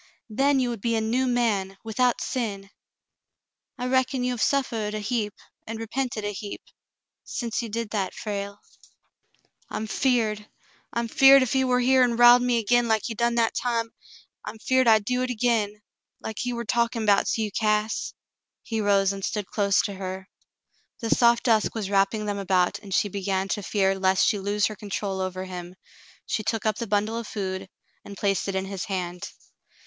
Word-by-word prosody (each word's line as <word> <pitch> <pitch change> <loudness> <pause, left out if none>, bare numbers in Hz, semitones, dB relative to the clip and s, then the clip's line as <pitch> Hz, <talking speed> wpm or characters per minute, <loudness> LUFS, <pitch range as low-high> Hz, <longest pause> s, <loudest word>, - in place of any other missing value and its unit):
"Then 275 +5 +2
you 250 -1 +1
would 235 -4 -5
be 230 +1 0
a - - +2
new 240 +4 0
man, 210 -6 0
without 240 +2 +1
sin. 200 -5 -3 1.1
I 250 - -4
reckon 260 0 +1
you 250 - 0
have 240 - -5
suffered 225 -6 0
a - - -2
heap, 210 -1 -2 0.3
and 225 +1 -5
repented 225 -1 -3
a 205 - -1
heap 205 0 -7 0.4
— - - -62 0.2
since 235 -1 -3
you 230 - -6
did 225 0 -4
that, 195 -4 -2
Frale 200 -1 -5 0.6
?" - - -40
"I'm 220 - -3
'feared 220 -3 0 0.2
— - - -34
I'm 235 0 -2
'feared 270 +3 +7
ef 255 - -2
he 265 0 +3
war 250 -1 +2
here 260 +1 +4
an' 245 -2 +3
riled 240 +1 +8
me 245 -1 +2
agin 240 +2 +2
like 220 -2 +1
he 230 - -3
done 235 +1 0
that 230 -1 +2
time 230 -2 -1 0.3
— - - -32
I'm - - -7
'feared 260 +3 +2
I'd 220 -2 +5
do 250 +3 0
hit 255 - -1
agin 215 -3 0 0.2
— - - -61
like 220 - -5
he 245 - -1
war 235 0 -4
talkin' 235 0 0
'bouts 200 +1 +3
you, 215 -2 -2
Cass." 215 0 0 0.5
He 225 -2 -2
rose 200 -1 +3
and 195 -1 -7
stood 210 0 -2
close 200 0 +1
to 205 - -3
her. 190 0 -6 0.7
The 230 -2 -3
soft 235 -1 +4
dusk 225 -3 +2
was 205 -3 -3
wrapping 200 +2 +2
them 205 -1 -2
about, 185 -2 +1
and 200 -2 -12
she 205 - +2
began 195 -1 -2
to 205 - -1
fear 195 -1 +1
lest 190 -1 +2
she 210 - +1
lose 205 +2 0
her 215 - -2
control 195 -1 -4
over 185 0 -3
him. 180 -1 -8 0.5
She - - -1
took 220 +1 -2
up 215 -1 +1
the 235 - -4
bundle 210 +3 0
of 230 - -7
food 190 -2 -4 0.3
and 200 - -10
placed 195 0 0
it 195 - -2
in 190 0 -1
his 195 -2 -5
hand. 180 -3 -4
215 Hz, 200 wpm, -25 LUFS, 200-235 Hz, 1.1 s, riled